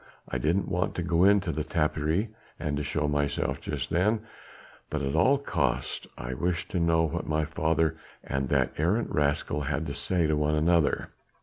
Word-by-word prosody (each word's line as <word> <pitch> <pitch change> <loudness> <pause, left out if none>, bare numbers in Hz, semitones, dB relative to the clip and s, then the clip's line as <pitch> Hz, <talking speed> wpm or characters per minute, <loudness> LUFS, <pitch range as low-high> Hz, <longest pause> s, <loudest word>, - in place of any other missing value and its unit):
I - - -2
didn't 85 +6 +1
want 90 -1 -1
to 90 - -2
go 85 +1 +3
into 100 -3 +4
the 75 0 -2
tapperij 80 +5 0 0.3
and 75 - -2
to 75 - -1
show 75 +1 -1
myself 75 -1 -1
just 70 -4 -4
then, 105 +6 +2 0.7
but 75 -2 -2
at 70 0 -1
all 130 - +5
costs 80 - -1
I - - -4
wished 85 +5 -2
to 90 - 0
know 85 -1 +3
what 80 - -2
my 75 0 +1
father 80 0 +1 0.3
and 70 -1 -2
that - - +2
arrant 95 +9 +1
rascal 75 0 0
had 75 +3 -2
to 70 - -4
say 90 +3 0
to 75 0 +2
one 75 +1 +1
another. 80 0 +2
80 Hz, 185 wpm, -28 LUFS, 75-85 Hz, 0.7 s, all